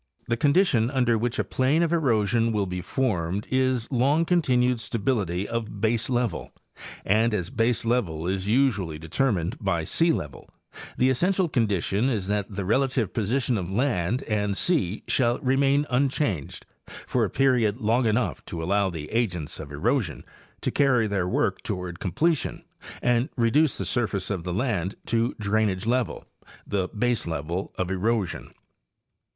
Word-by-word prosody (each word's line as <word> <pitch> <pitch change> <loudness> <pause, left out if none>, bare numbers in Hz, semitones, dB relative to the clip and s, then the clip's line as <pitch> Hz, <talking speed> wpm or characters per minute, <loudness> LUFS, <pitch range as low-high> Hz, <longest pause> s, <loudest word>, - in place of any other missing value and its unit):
—The 115 - +2
condition 140 - +3
under 125 -4 +2
which 120 +3 -1
a - - +1
plain 140 +6 +1
of 170 0 0
erosion 115 -6 +2
will 105 -2 0
be 90 -1 -4
formed 95 -4 -1
is 130 -2 +1
long 140 +6 +2
continued 125 -8 +2
stability 100 -5 -1
of 115 -3 -4
baselevel, 115 -1 0 0.6
and 110 +3 +3
as 90 0 -3
baselevel 115 -8 0
is 95 +1 -2
usually 105 - +1
determined 85 - -1
by 90 -5 0
sealevel, 80 - -1 0.5
the 130 +1 +3
essential 180 +7 +1
condition 110 - 0
is 105 -7 -1
that 100 0 -1
the 100 -2 -4
relative 125 0 +1
position 120 +2 0
of 90 -1 -4
land 120 -1 0
and 105 -2 -1
sea 130 - 0
shall 120 -1 +2
re 130 0 +2
main 140 +1 +3
unchanged 125 - -1 0.2
for - - -2
a - - 0
period 125 -6 +2
long 115 +2 +2
enough 110 +3 0
to 80 -2 -5
allow 100 +3 +1
the 80 -4 -6
agents 95 -10 -2
of 70 - -8
erosion 80 - -1 0.4
to - - -1
carry 130 -5 +3
their 100 -4 -1
work - - 0
toward 90 -2 -5
completion 155 - -1 0.4
and 120 +3 +2
reduce 130 +6 +3
the - - -3
surface 105 -6 -1
of 90 -4 -3
the 90 - -2
land 100 -4 -1
to 115 +2 0
drainage 105 -2 0
level, 120 +1 -1 0.4
the 95 -2 -1
baselevel 95 -7 -2
of 95 0 -2
erosion. 100 0 -1
115 Hz, 145 wpm, -25 LUFS, 95-130 Hz, 0.6 s, condition